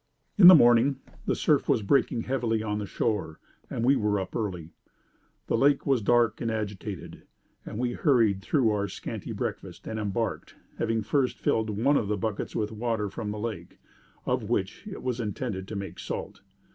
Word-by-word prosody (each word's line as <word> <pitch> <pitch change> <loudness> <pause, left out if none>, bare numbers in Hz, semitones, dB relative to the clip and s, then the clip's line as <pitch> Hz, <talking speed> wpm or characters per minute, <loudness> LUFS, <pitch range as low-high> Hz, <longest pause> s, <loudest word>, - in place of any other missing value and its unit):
"'In 195 -5 +9
the 185 - +12
morning, 120 0 +5 0.3
the - - +2
surf - - +1
was 110 - +2
breaking 120 +1 +2
heavily 115 -4 -1
on 105 -1 -2
the 105 - -4
shore, 100 -9 -2 0.3
and 115 - -2
we 135 +2 +5
were 105 -4 +1
up 95 - -6
early. 90 -7 -3 0.7
The - - 0
lake 140 +1 +3
was 135 -4 +2
dark 115 0 +2
and 115 - -1
agitated, 105 -3 -5 0.5
and - - -6
we 120 +1 0
hurried 115 - +2
through 120 +1 +2
our 100 -1 0
scanty 95 - -6
breakfast, - - -5
and 110 0 -4
embarked 110 +2 -3 0.2
having 115 -1 0
first 135 +2 0
filled 110 -1 0
one 120 +8 +2
of 105 - -1
the 105 0 -1
buckets 105 +1 -3
with 105 -1 -1
water 110 -2 -2
from 105 +1 -5
the 105 - -4
lake, 110 +1 -6 0.5
of - - -1
which - - -2
it - - -7
was 125 -1 -2
intended 105 -3 -4
to 110 - -6
make 100 -1 -6
salt. - - -6
110 Hz, 185 wpm, -27 LUFS, 105-120 Hz, 0.7 s, the